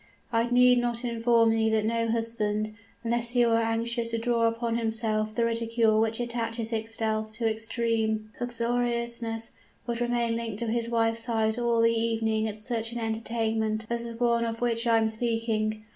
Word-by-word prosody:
I 230 +1 +2
need 250 0 +5
not 240 0 -1
inform 230 -1 +3
you 225 0 +2
that 220 -1 +1
no 230 +1 0
husband, 215 -2 -1 0.3
unless 235 0 +2
he 245 0 +3
were 230 0 +3
anxious 230 +1 -1
to 230 - -1
draw 230 0 +1
down 230 - +3
upon 230 0 -2
himself 220 -1 0
the 235 - +2
ridicule 230 -1 +2
which 225 +1 0
attaches 230 -1 -2
itself 220 -1 -2
to 230 +1 -1
extreme 220 -1 -1
uxoriousness, 235 -1 -1 0.3
would 235 -1 -3
remain 240 -1 0
linked 230 -3 -4
to 235 - -2
his 235 0 -1
wife's 225 -1 +1
side 225 -1 0
all 235 -1 +2
the 230 0 +5
evening 225 -1 0
at 215 -1 -5
such 225 0 -3
an - - -4
entertainment 225 -1 -1
as 235 0 -1
the 235 0 -6
one 235 0 +1
of 230 0 -3
which 235 -1 0
I 230 -1 +5
am 220 0 +2
speaking. 220 -1 -1
230 Hz, 175 wpm, -27 LUFS, 220-235 Hz, 0.3 s, need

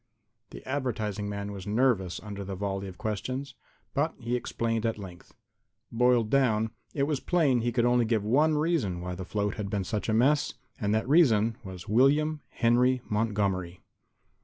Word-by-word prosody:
The - - -11
advertising 110 -7 -2
man 100 0 -4
was 100 -1 -8
nervous 105 -6 +1
under 100 -1 -6
the 95 0 -5
volley 100 0 -3
of 95 - -10
questions, 130 +6 -4 0.4
but 155 +3 0
he 120 0 -2
explained 115 -2 -2
at 115 -2 0
length. 90 -4 -11 0.6
Boiled 120 -2 +3
down, 110 -5 +2 0.2
it 140 - +1
was 145 -1 0
plain 150 -9 +2
he 120 +1 0
could 120 0 +1 0.2
give 110 -3 +1
only - - -3
one 150 +6 +3
reason 150 - 0
why 90 0 -4
the 90 +1 -6
float 105 +1 -2
had 105 -2 -3
been 100 -1 -1
such 105 +4 -3
a - - +2
mess. 145 +6 +2 0.2
And 105 -1 0
that 110 - -1
reason 115 -8 +4
was 95 -3 -9
William 145 +7 +3
Henry 125 +1 +2
Montgomery. 100 -5 -1
110 Hz, 170 wpm, -28 LUFS, 100-130 Hz, 0.6 s, reason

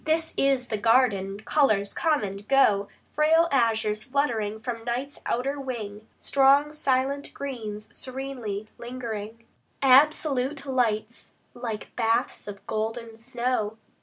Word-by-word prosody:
This 320 +1 0
is 270 -2 +1
the 215 - -2
garden: 205 -4 +2
colors 215 -7 +2
come 310 -7 +1
and 200 +1 -6
go, 210 -7 +4 0.2
Frail 320 +2 +4
azures 220 -4 +1
fluttering 235 -6 -1
from 230 0 -5
night's 250 +4 -3
outer 275 +4 -1
wing, 220 -5 -6
Strong 280 +2 +4
silent 280 -1 0
greens 220 -6 -5
serenely 250 -6 -5
lingering, 230 -2 -6 0.4
Absolute 275 0 +4
lights 235 -4 -1 0.2
like 230 -3 -6
baths 230 -2 0
of 200 -1 -8
golden 225 +1 -4
snow. 240 -2 -2
240 Hz, 115 wpm, -26 LUFS, 215-275 Hz, 0.4 s, go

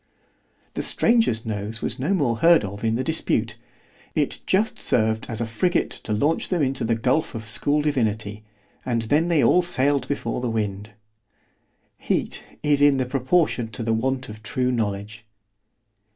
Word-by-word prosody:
The - - -2
stranger's 225 - +2
nose 110 +1 -4
was 125 - -3
no 145 +9 -1
more 125 -10 +1
heard 165 -1 +5
of 100 +2 -7
in 110 0 +1
the 130 - -1
dispute—it 115 -6 -3
just 210 +4 +1
served 110 -1 +1
as 115 -2 -3
a 115 - -1
frigate 175 +11 0
to - - -6
launch 145 +10 +1
them 175 -5 +1
into 135 0 0
the 115 0 +1
gulph 130 +5 0
of 110 -1 -5
school 145 +6 +1
divinity——and 110 -2 -3
then 150 +9 +2
they 165 -5 +3
all 180 - +5
sailed 140 -6 +1
before 125 -4 -3
the 125 - -1
wind. 105 -2 -3 1.1
Heat - - -2 0.2
is 145 -1 +2
in 145 -1 +5
proportion 130 -1 +1
to 110 +1 -6
the 115 0 0
want 130 +3 -1
of 110 0 -10
true 125 +2 -1
knowledge. 105 -2 -3
120 Hz, 155 wpm, -23 LUFS, 110-145 Hz, 1.1 s, heard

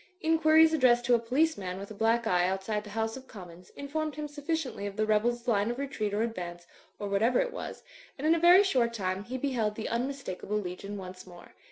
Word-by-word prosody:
Inquiries 320 -1 +5
addressed 245 -5 +4
to 245 - +3
a 235 - +5
police 265 +5 +1
man 185 -1 -4
with 200 +2 -8
a - - -5
black 225 +2 +1
eye 180 -4 +2
outside 195 +3 -2
the 210 - -11
House 225 +1 -2
of 265 0 -11
Commons 180 -3 -12
informed 300 +2 -3
him 300 0 -4
sufficiently 290 -7 -3
of 200 - -7
the 215 0 +1
rebels' 235 +3 +1
line 210 -2 +2
of 240 - -3
retreat 265 -7 -3
or 210 +2 0
advance, 175 -6 -5 0.3
or 205 - -4
whatever 220 +5 +2
it - - -1
was; - - -7 0.3
and 285 - -5
in 320 - +5
a 335 - +1
very 350 +4 +7
short 245 -11 +1
time 190 -1 -2
he 255 +3 -4
beheld 245 -6 -1
the 220 - -4
unmistakable 235 -5 -3
legion 200 +1 -5
once 185 -1 -9
more. 175 -1 -14
230 Hz, 220 wpm, -29 LUFS, 200-280 Hz, 0.3 s, very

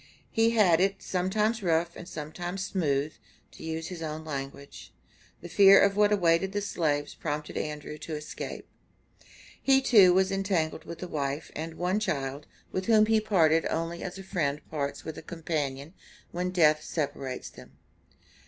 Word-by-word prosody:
He 225 0 +3
had 200 -8 +4
had - - +2
it 195 +1 0
"sometimes 210 +5 0
rough 170 -1 +1
and 175 - -9
sometimes 175 +5 -5
smooth," 150 -5 0 0.4
to - - -13
use 160 0 -4
his 180 -3 -7
own 155 0 -5
language. 140 -1 -7 0.5
The 175 - -8
fear 195 +2 +7
of 200 0 +4
what 210 0 +4
awaited 190 -1 +2
the 205 - -1
slaves 150 -7 -1
prompted 150 -1 -4
Andrew 150 0 -5
to 160 - -5
escape. 150 0 -7 0.9
He 270 0 +5
too 210 -9 +6
was 190 +1 +3
entangled 190 -5 -1
with 170 - -8
a - - -4
wife 145 -1 -3
and 160 +1 -5
one 180 +4 0
child, 140 -7 -3 0.2
with 185 +2 -3
whom 215 -2 +6
he 220 0 +3
parted 165 -7 +3
only 165 +1 -3
as 180 0 -5
a 195 - -8
friend 150 -6 -2
parts 140 -2 -3
with 160 - -6
a - - -9
companion 155 -3 -4 0.4
when 180 +1 -2
death 155 -4 +4
separates 135 -4 -4
them. - - -14
170 Hz, 165 wpm, -28 LUFS, 150-195 Hz, 0.9 s, fear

